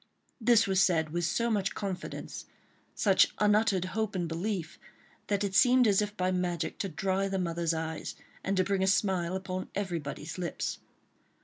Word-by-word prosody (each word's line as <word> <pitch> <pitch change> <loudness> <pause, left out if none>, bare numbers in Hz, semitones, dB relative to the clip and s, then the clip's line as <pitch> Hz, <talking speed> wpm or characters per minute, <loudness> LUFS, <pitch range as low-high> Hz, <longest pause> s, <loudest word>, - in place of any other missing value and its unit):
This 230 -1 +5
was 190 -1 +2
said 160 -5 +2
with 175 +1 -1
so 235 +7 0
much 200 -3 0
confidence, 195 -3 -5 0.5
such 195 -3 +4
unuttered 210 -3 +3
hope 220 +2 -2
and 175 -2 -1
belief, 170 0 -3 0.5
that 205 -1 0
it 200 -2 -2
seemed 250 +4 +5
as 200 -1 +4
if 210 0 -4
by 185 0 +1
magic 175 -3 -2
to 195 - -2
dry 190 +4 0
the 195 0 -2
mother's 170 -2 -1
eyes, 160 0 -4 0.3
and 195 0 -1
to 185 - +4
bring 195 +1 0
a 190 - +2
smile 190 -2 +1
upon 185 -1 -4
everybody's 165 -4 -4
lips. 175 -3 -3
190 Hz, 170 wpm, -30 LUFS, 170-200 Hz, 0.5 s, This